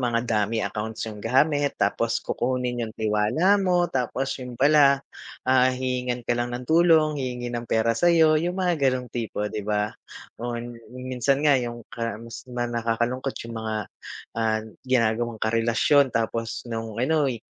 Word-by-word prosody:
mga 120 Hz, -2 st, +1 dB
dummy 110 Hz, 0 st, 0 dB
accounts 110 Hz, 0 st, -4 dB
yung 105 Hz, -2 st, -7 dB
gamit 145 Hz, +6 st, +2 dB
tapos 115 Hz, +3 st, +1 dB
kukunin 125 Hz, -1 st, -1 dB
yung 110 Hz, -, -9 dB
tiwala 110 Hz, -, +2 dB
mo 180 Hz, -2 st, +2 dB
tapos 130 Hz, +1 st, -2 dB
yun 125 Hz, -1 st, -7 dB
pala, 140 Hz, 0 st, +5 dB, 0.4 s
ah, 130 Hz, 0 st, +4 dB
hihingan 125 Hz, -1 st, -2 dB
ka -, -, +1 dB
lang 120 Hz, 0 st, -1 dB
ng 125 Hz, +1 st, -4 dB
tulong, 160 Hz, -1 st, +4 dB
hihingi 125 Hz, -2 st, -4 dB
ng 120 Hz, 0 st, -4 dB
pera 115 Hz, +1 st, +2 dB
sa'yo, 160 Hz, +3 st, +4 dB
yung 175 Hz, +2 st, -2 dB
mga 175 Hz, -7 st, +2 dB
ganong 125 Hz, -1 st, -2 dB
tipo, 115 Hz, -3 st, -3 dB
'di 110 Hz, -, -2 dB
ba. 105 Hz, 0 st, 0 dB, 0.5 s
O 120 Hz, 0 st, -3 dB
yun, 120 Hz, 0 st, -7 dB
kung 125 Hz, +2 st, -11 dB
minsan 135 Hz, +4 st, +1 dB
nga 140 Hz, -4 st, +5 dB
yung 120 Hz, -1 st, -5 dB
kamis 115 Hz, 0 st, -6 dB
di -, -, -11 dB
ba 120 Hz, -, 0 dB
nakakalungkot 120 Hz, +3 st, -1 dB
yung 115 Hz, 0 st, -7 dB
mga, 110 Hz, 0 st, -3 dB, 0.6 s
ah, 110 Hz, -1 st, +1 dB, 0.2 s
ginagawang 120 Hz, -2 st, +1 dB
karelasyon 115 Hz, +5 st, +3 dB
tapos 115 Hz, -1 st, -2 dB
nung 115 Hz, -2 st, -5 dB
ano'y, 135 Hz, 0 st, +1 dB
120 Hz, 160 wpm, -25 LUFS, 115-135 Hz, 0.6 s, pala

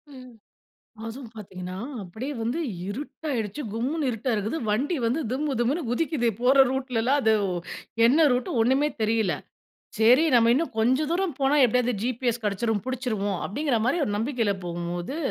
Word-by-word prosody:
ம். 255 Hz, -1 st, -12 dB, 0.7 s
அதுவும் 230 Hz, +1 st, -8 dB
பார்த்தீங்கனா 185 Hz, -3 st, -7 dB, 0.2 s
அப்டியே 220 Hz, +10 st, -6 dB
வந்து 240 Hz, +8 st, -1 dB, 0.3 s
இருட்டயிடுச்சு 250 Hz, 0 st, -4 dB
கும்முனு 270 Hz, +7 st, -1 dB
இருட்டா 245 Hz, +2 st, -2 dB
இருக்குது. 215 Hz, +8 st, -2 dB
வண்டி 265 Hz, +11 st, +1 dB
வந்து 250 Hz, +8 st, 0 dB
திம்மு 285 Hz, +2 st, -1 dB
திம்முன்னு 275 Hz, +8 st, +1 dB
குதிக்குது 265 Hz, -1 st, 0 dB
போற 255 Hz, +2 st, +4 dB, 0.2 s
ரூட்ல 260 Hz, -3 st, -1 dB
எல்லாம் 265 Hz, +5 st, +2 dB
அது 220 Hz, -3 st, +4 dB, 0.7 s
என்ன 300 Hz, +6 st, +5 dB
ரூட் 245 Hz, 0 st, 0 dB
ஒண்ணுமே 265 Hz, +6 st, +3 dB
தெரியல்ல. 220 Hz, -4 st, +1 dB, 0.6 s
சரி 245 Hz, +7 st, +6 dB
நம்ம 230 Hz, -1 st, +5 dB
இன்னும் 305 Hz, -2 st, -1 dB
கொஞ்சம் 260 Hz, +7 st, +2 dB
தூரம் 345 Hz, -4 st, 0 dB
போனா 275 Hz, +2 st, +3 dB
எப்படியாவது 250 Hz, +1 st, +2 dB
ஜிபிஎஸ் 240 Hz, -1 st, -1 dB
கேடச்சிடும் 210 Hz, +1 st, 0 dB
புடிச்சிடுவோம் 220 Hz, -7 st, -2 dB
அப்டின்ற 270 Hz, +2 st, 0 dB
மாரி 270 Hz, +7 st, +2 dB
ஒரு -, -, -2 dB
நம்பிக்கையில 225 Hz, -2 st, 0 dB
போகும்போது, 175 Hz, -, -4 dB
245 Hz, 145 wpm, -26 LUFS, 220-275 Hz, 0.7 s, சரி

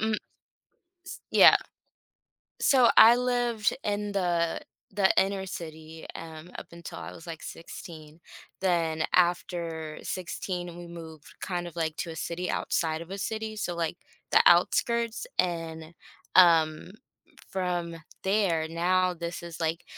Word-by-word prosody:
Mm 220 Hz, 0 st, +1 dB, 0.9 s
S -, -, -8 dB
Yeah. -, -, +8 dB, 1.0 s
So, 255 Hz, -4 st, +5 dB
I 230 Hz, +2 st, +10 dB
lived 245 Hz, -3 st, 0 dB
in 205 Hz, 0 st, -2 dB
the 175 Hz, -4 st, 0 dB, 0.3 s
the 190 Hz, -1 st, +3 dB
inner 195 Hz, 0 st, +2 dB
city, 160 Hz, -2 st, -8 dB
um, 160 Hz, +1 st, -9 dB
up -, -, -11 dB
until 170 Hz, 0 st, -9 dB
I -, -, -8 dB
was, 165 Hz, -, -12 dB
like, 165 Hz, -2 st, -7 dB
16. 160 Hz, -2 st, -10 dB, 0.4 s
Then 165 Hz, -4 st, +1 dB
after 170 Hz, -3 st, 0 dB
16, 175 Hz, -1 st, -4 dB
we 175 Hz, -, -8 dB
moved 160 Hz, -3 st, -11 dB
kind 175 Hz, -2 st, -3 dB
of, 175 Hz, 0 st, -9 dB
like, 160 Hz, -2 st, -1 dB
to 175 Hz, -, -3 dB
a 160 Hz, -, -6 dB
city 175 Hz, +3 st, -3 dB
outside 160 Hz, -1 st, -1 dB
of 170 Hz, -, -10 dB
a 195 Hz, -, -5 dB
city, 220 Hz, +2 st, -4 dB
so, 180 Hz, -4 st, -3 dB
like, 170 Hz, 0 st, -2 dB, 0.4 s
the -, -, +7 dB
outskirts, 230 Hz, -, +3 dB
and, 165 Hz, -2 st, -2 dB, 0.4 s
um, 165 Hz, -2 st, +5 dB, 0.6 s
from 175 Hz, -3 st, -2 dB, 0.3 s
there, 190 Hz, -5 st, +1 dB
now 180 Hz, +2 st, +2 dB
this 170 Hz, 0 st, -6 dB
is, 170 Hz, -1 st, -8 dB
like, 165 Hz, 0 st, -2 dB
175 Hz, 135 wpm, -28 LUFS, 165-190 Hz, 1.0 s, I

